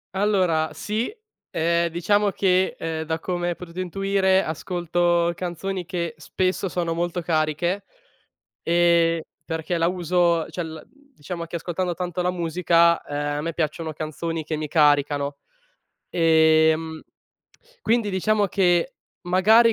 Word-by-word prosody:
Allora 185 -6 +2
sì, 215 - -2 0.4
ehm, 170 +1 +1
diciamo 205 +5 +2
che, 190 -1 +1
ehm, 160 -1 -3
da 160 0 -1
come 175 0 -2
hai 175 - -2
potuto 175 0 -9
intuire, 190 +1 +1
ascolto 175 +1 0
canzoni 180 +1 -4
che 170 -3 -3
spesso 185 +4 -1
sono 170 -2 -1
molto 175 +1 -2
cariche, 165 +4 0 0.8
e 170 -1 +3 0.2
perché 160 +2 -3
la 165 0 +2
uso 175 -2 +1
cioè 175 - -4
la 160 -1 -8
diciamo 190 - -9
che 170 - -4
ascoltando 175 +1 -2
tanto 180 0 -3
la 180 0 +1
musica, 170 -1 +2
ehm, 145 0 -3
a - - -2
me 165 +2 -3
piacciono 160 0 -2
canzoni 155 +1 -4
che 155 - -2
mi 155 -1 -4
caricano, 145 -2 +2 0.8
ehm, 160 -1 +3 0.8
quindi 230 - +1
diciamo 205 +2 +1
che 175 -3 +1 0.3
magari 215 +6 +5
170 Hz, 130 wpm, -23 LUFS, 160-185 Hz, 0.8 s, magari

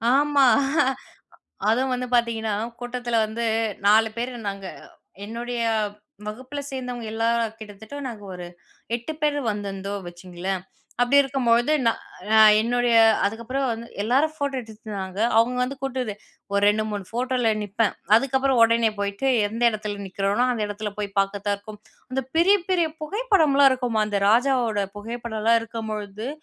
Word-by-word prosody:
ஆமா. 285 -1 +4 1.2
அதுவும் 255 +4 +2
வந்து 250 0 -3
பார்த்தீங்கன்னா, 225 -3 +1 0.3
கூட்டத்தில 245 -1 -2
வந்து 225 +2 -4 0.4
4 220 +2 +5
பேரு 240 +2 -3 0.2
நாங்க. 195 -1 -5 0.6
என்னுடைய 235 +3 -4 0.7
வகுப்பில 255 +7 -6
சேர்ந்தவங்க 250 -3 -5
எல்லார 230 +1 +1 0.2
கிட்டத்தட்ட 215 +4 -10
நாங்க 220 -4 -8
ஒரு 180 -1 -7 0.5
8 240 +7 -6
பேர் 295 -1 +2
வந்திருந்தோம், 200 -1 -5
வச்சுக்கோங்களேன். 180 +1 -5 0.4
அப்பிடி 245 +4 +4
இருக்கும்பொழுது 250 -1 +2
நான் 230 - +2 0.3
நான் 220 -1 +8
என்னுடைய 240 +1 +1 0.3
அதுக்கப்புறம் 235 +6 -2
வந்து 230 0 -5 0.2
எல்லாரும் 270 +8 +2
ஃபோட்டோ 285 -2 -2
எடுத்துட்டிருந்தாங்க. 210 -4 -7 0.2
அவுங்க 245 +2 +2
வந்து 265 +3 -2
கூட்டது 255 -5 -2 0.4
ஒரு 200 0 +1
2, 215 +1 +2
3 205 -2 -4
ஃபோட்டோல 245 0 0
நிப்பேன். 205 +1 0 0.2
அதுக்கப்புறம் 265 0 +2
உடனே 230 -1 +4
போயிட்டு 200 +6 -1 0.2
எந்த 230 +3 -5
இடத்துல 210 -2 -5
நிக்கிறனோ, 200 +5 0
அந்த 225 -3 -2
இடத்துல 210 0 -4
போய் 205 -1 -3
பார்க்கிறதா 200 +1 0
இருக்கும். 210 +1 -12 0.3
அந்த 265 - 0
பெரிய, 380 +5 +6
பெரிய 345 -3 +2
புகைப்படமெல்லாம் 310 - +3
இருக்குமா! 245 -4 0
அந்த 205 -1 -1
ராஜாவோட 235 -3 +2
புகைப்படல்லாம் 230 0 0
இருக்கம்பொழுது, 215 -1 -5
230 Hz, 130 wpm, -24 LUFS, 210-255 Hz, 1.2 s, நான்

